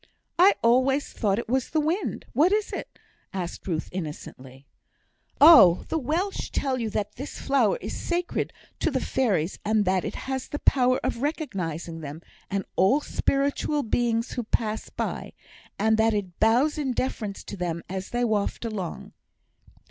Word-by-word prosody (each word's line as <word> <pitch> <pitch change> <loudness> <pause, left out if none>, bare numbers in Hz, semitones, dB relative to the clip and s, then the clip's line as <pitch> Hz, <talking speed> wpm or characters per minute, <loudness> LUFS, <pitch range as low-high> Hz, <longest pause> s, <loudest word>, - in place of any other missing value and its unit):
"I 380 +3 +7
always 260 +4 +3
thought 200 -3 +1
it 235 - -3
was 255 +2 0
the 315 - +1
wind. 325 +7 -1
What 330 +6 +4
is 420 0 0
it?" - - -6 0.4
asked 180 -1 -5
Ruth, 160 -3 -2
innocently. 140 -6 -7 0.7
"Oh, 280 - +8
the 320 - 0
Welsh 335 +9 -2
tell 265 -2 -1
you 225 -2 -2
that 210 0 -3
this 275 +4 -7
flower 255 -7 +2
is - - -5
sacred 350 0 -2 0.3
to - - +1
the 270 -4 0
fairies, 195 -11 0
and 215 -1 +2
that 185 0 +1
it - - -4
has 265 -1 -3
the 290 - -4
power 255 -3 +3
of 235 - -2
recognising 180 - -3
them, 155 +2 -8 0.3
and 195 -1 -2
all 195 +11 +4
spiritual 285 +1 0
beings 230 0 0
who 245 - -2
pass 220 0 -2
by, - - -4 0.4
and 220 0 +3
that 220 0 +3
it 185 -4 -4
bows 250 +8 +3
in 270 -4 -1
deference 220 -5 -3
to - - -7
them 170 -3 -3
as 190 +1 -5
they 245 0 -1
waft 215 +1 -1
along. 200 -7 -5
230 Hz, 165 wpm, -26 LUFS, 190-275 Hz, 0.7 s, Oh